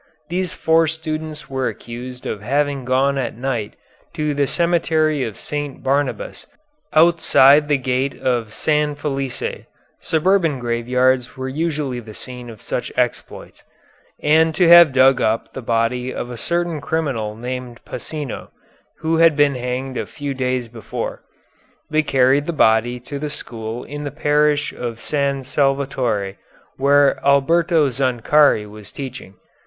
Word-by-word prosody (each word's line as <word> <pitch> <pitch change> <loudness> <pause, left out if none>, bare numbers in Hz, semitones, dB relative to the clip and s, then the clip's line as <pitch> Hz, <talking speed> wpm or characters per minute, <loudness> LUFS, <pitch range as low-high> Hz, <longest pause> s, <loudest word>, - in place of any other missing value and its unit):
These 180 0 -2
four 160 0 +2
students 155 -1 -4
were 130 -1 -2
accused 125 +2 -7
of 105 - -4
having 140 +3 -1
gone 135 +2 +2
at 125 -3 -3
night 120 -4 -3 0.4
to 150 -1 -1
the 140 -1 +1
Cemetery 160 -4 +1
of 110 -4 -6
St. 145 -2 -5
Barnabas, 145 - -2 0.4
outside 155 -3 +5
the 145 -1 +2
gate 130 +1 -1
of 120 -4 -1
San 150 +4 0
Felice, 135 -3 -4 0.3
suburban 165 -2 +1
graveyards 125 +1 0
were 130 0 -4
usually 145 -3 -2
the 110 -3 -11
scene 125 -1 -8
of 110 -2 -11
such - - -3
exploits, - - -3 0.6
and 160 +1 +4
to 175 +2 +4
have 170 -3 +9
dug 130 0 +4
up 110 +1 0
the 130 - -6
body 120 +2 0
of 125 - -5
a - - -6
certain 170 +4 -1
criminal 135 -10 -2
named 125 0 -6
Pasino, 150 -6 -6 0.5
who 160 +1 +1
had 165 -2 +5
been 145 -1 +3
hanged 125 +1 -4
a - - -4
few 145 -2 -5
days 130 -2 -1
before. 115 -2 -6 0.7
They 155 0 +3
carried 135 0 +2
the 170 - -1
body 120 -2 +3
to 140 +3 -6
the 150 +1 -3
school 115 -4 -6
in 145 +1 -7
the 145 - -3
Parish 150 0 +1
of 120 -2 -5
San 140 -1 -1
Salvatore, 130 -7 -1 0.4
where 140 +1 +4
Alberto 155 +2 +3
Zancari 130 -1 +3
was 105 -1 -11
teaching. 130 -8 -8
135 Hz, 140 wpm, -20 LUFS, 125-150 Hz, 0.7 s, have